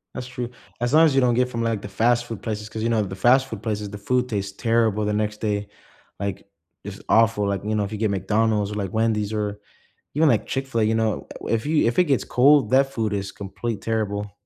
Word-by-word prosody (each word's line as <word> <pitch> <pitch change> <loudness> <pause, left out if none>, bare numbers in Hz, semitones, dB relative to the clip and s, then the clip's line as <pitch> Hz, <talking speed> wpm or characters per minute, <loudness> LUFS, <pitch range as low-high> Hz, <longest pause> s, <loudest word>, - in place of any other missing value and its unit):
That's 125 - -5
true, 125 -2 -5 0.3
as 120 +2 -1
long 160 +1 +7
as 155 - +3
you 135 - +4
don't 125 -2 +3
get 125 +1 +2
from, 115 -1 -3
like, 115 -3 -1
the 100 - -7
fast 120 +4 +2
food 115 -4 -7
places, 105 -1 -4
‘cause, 110 - -6
you 115 - 0
know, 115 -2 +2
the 95 -1 -6
fast 130 +6 +4
food 110 -3 -7
places, 105 -2 -3
the 105 - -7
food 125 +5 0
tastes 100 -3 -3
terrible 115 -2 +1
the 105 - 0
next 105 0 -2
day, 105 -2 -1 0.5
like, 100 0 -4 0.4
it's 100 -1 -8
awful, 115 -2 +4
like, 100 -1 -2
you 110 +1 0
know, 105 - +1
if 100 - -5
you 110 - -4
get 110 0 0
McDonald's 105 +2 +1
or, - - -5
like, 100 -3 -3
Wendy's 110 -2 0
or 105 -1 -2 0.5
even, 155 +1 +4
like, 115 -5 +2
Chick-fil-A, 135 -5 -1
you 110 +1 +1
know, 110 -1 -1 0.2
uh - - -6
if 115 +2 0
you 155 +1 +2
if 115 +6 +1
it 180 - +5
gets 140 -5 +1
cold, 135 -1 +4
that 135 +2 +3
food 110 -2 -1
is 100 -1 -3
complete 105 +2 -5
terrible. 105 -2 -2
110 Hz, 245 wpm, -23 LUFS, 105-120 Hz, 0.5 s, long